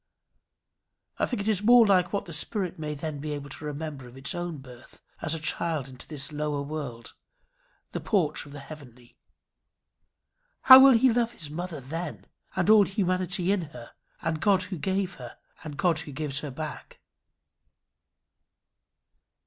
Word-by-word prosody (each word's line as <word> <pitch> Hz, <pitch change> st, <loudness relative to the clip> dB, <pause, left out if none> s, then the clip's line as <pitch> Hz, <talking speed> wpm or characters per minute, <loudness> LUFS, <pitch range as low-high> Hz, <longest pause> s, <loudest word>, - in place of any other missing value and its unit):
I -, -, +2 dB
think 245 Hz, -5 st, -2 dB
it -, -, -6 dB
is 210 Hz, -3 st, +2 dB
more 235 Hz, +2 st, +7 dB
like 185 Hz, -3 st, +3 dB
what 200 Hz, -, -2 dB
the 170 Hz, -, -9 dB
spirit 185 Hz, +2 st, -2 dB
may 150 Hz, -1 st, -4 dB
then 150 Hz, 0 st, -5 dB
be 150 Hz, +1 st, -4 dB
able 145 Hz, -1 st, -7 dB
to 150 Hz, -, -8 dB
remember 145 Hz, -3 st, -6 dB
of 125 Hz, +2 st, -14 dB
its 135 Hz, +1 st, -2 dB
own 175 Hz, -2 st, -4 dB
birth 130 Hz, -2 st, -13 dB, 0.2 s
as 160 Hz, 0 st, +1 dB
a -, -, -4 dB
child 155 Hz, -2 st, -1 dB
into 130 Hz, -2 st, -8 dB
this 150 Hz, -1 st, -3 dB
lower 150 Hz, -1 st, -2 dB
world, 140 Hz, -6 st, -6 dB, 0.8 s
this -, -, -4 dB
porch 175 Hz, -9 st, +1 dB
of -, -, -13 dB
the 145 Hz, -1 st, -9 dB
heavenly. 130 Hz, -5 st, -13 dB, 1.5 s
How 260 Hz, 0 st, +11 dB
will 270 Hz, 0 st, +8 dB
he 235 Hz, +1 st, +4 dB
love 235 Hz, 0 st, +1 dB
his 155 Hz, -9 st, -8 dB
mother 170 Hz, -1 st, -5 dB
then! 160 Hz, +5 st, -6 dB, 0.3 s
and -, -, 0 dB
all 215 Hz, -1 st, +7 dB
humanity 185 Hz, -1 st, 0 dB
in 200 Hz, -2 st, +1 dB, 0.2 s
her, 120 Hz, -, -11 dB, 0.3 s
and 160 Hz, -1 st, -1 dB
God 195 Hz, -3 st, +3 dB
who 185 Hz, -3 st, -6 dB
gave 190 Hz, +1 st, -1 dB
her, 120 Hz, -, -9 dB, 0.3 s
and 150 Hz, -3 st, -7 dB
God 175 Hz, -4 st, +2 dB
who 155 Hz, -2 st, -8 dB
gives 140 Hz, 0 st, -1 dB
her 150 Hz, -, -5 dB
back! 155 Hz, +3 st, -7 dB
155 Hz, 165 wpm, -27 LUFS, 145-185 Hz, 1.5 s, How